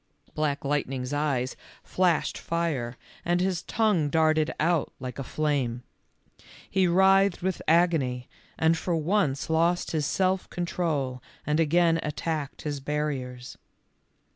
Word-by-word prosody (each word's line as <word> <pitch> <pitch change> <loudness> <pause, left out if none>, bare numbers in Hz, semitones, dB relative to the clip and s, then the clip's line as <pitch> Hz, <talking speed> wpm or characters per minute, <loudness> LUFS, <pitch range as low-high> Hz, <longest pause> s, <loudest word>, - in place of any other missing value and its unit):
Black 145 -2 -1
Lightning's 135 -2 -1
eyes 140 -4 0 0.3
flashed 180 -4 +1
fire, 150 -8 -2 0.3
and 175 +1 +1
his 185 -2 0
tongue 210 -10 +1
darted 155 0 +2
out 165 -1 +1
like 130 +1 -6
a - - -2
flame. 130 -5 -1 0.8
He 190 -1 +2
writhed 190 +1 +4
with 190 -1 -1
agony, 155 -7 +2 0.3
and 160 +1 +3
for 170 +1 -1
once 160 -4 0
lost 170 +2 +1
his 155 -3 0
self 185 0 0
control 155 -7 -2 0.2
and 150 +2 +1
again 165 +1 +3
attacked 150 -1 -3
his 145 -2 -3
barriers. 135 -4 -4
155 Hz, 120 wpm, -27 LUFS, 140-175 Hz, 0.8 s, writhed